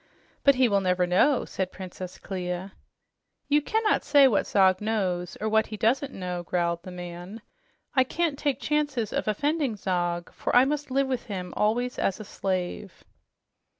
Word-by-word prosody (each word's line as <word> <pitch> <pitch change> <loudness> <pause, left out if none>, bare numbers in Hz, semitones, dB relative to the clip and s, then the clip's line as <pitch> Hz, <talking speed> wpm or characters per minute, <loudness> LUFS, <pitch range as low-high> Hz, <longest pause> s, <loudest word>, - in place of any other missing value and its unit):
"But 280 -1 +6
he 255 -1 +4
will 200 -3 +2
never 180 -1 +2
know," 190 +10 +3
said 190 -1 -3
Princess 185 0 -8
Clia. 185 0 -5 0.7
"You 295 +1 +3
cannot 440 +6 +1
say 285 -2 +6
what 215 -6 +1
Zog 190 -1 +4
knows 185 -5 -1
or 215 - -2
what 220 +1 +2
he 215 - -6
doesn't 260 +6 +1
know," 180 -4 -4
growled 170 -1 -1
the 185 - -9
man. 180 +4 -8 0.5
"I 260 - +5
can't 305 +1 -1
take 280 -3 0
chances 290 -7 -1
of - - -2
offending 285 +3 0
Zog, 175 -3 -2
for - - -2
I 250 +1 +7
must 290 +1 -2
live 275 +1 +2
with 260 -2 -3
him 185 -4 -5
always 245 +4 0
as 195 - 0
a - - -6
slave." 185 -2 -4
210 Hz, 170 wpm, -26 LUFS, 180-265 Hz, 0.7 s, I